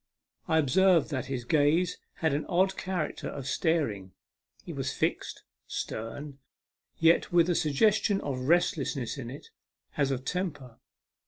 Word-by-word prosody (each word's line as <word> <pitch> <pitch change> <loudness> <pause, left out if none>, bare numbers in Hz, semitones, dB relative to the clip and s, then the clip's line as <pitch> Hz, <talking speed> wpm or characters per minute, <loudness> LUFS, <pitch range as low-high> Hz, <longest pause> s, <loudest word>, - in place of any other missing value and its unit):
I 160 - +2
observed 170 +2 +4
that 130 -3 -2
his 130 -3 -4
gaze 160 +5 +2 0.2
had 160 -3 0
an 145 +2 -2
odd 190 +1 +2
character 180 -5 -3
of 135 - -6
staring; 135 - 0 0.5
it - - -6
was - - -2
fixed, - - -2 0.2
stern, 135 +6 -5 0.6
yet 165 +1 +3
with 175 -1 +4
a - - +3
sug 155 -3 0
gestion 205 +4 +3
of 130 -2 -3
restlessness 145 -6 +1
in 120 -3 -6
it, 140 +4 -10 0.5
as 140 -2 +2
of 130 -1 -3
temper. 145 -10 -4
150 Hz, 145 wpm, -29 LUFS, 135-175 Hz, 0.6 s, observed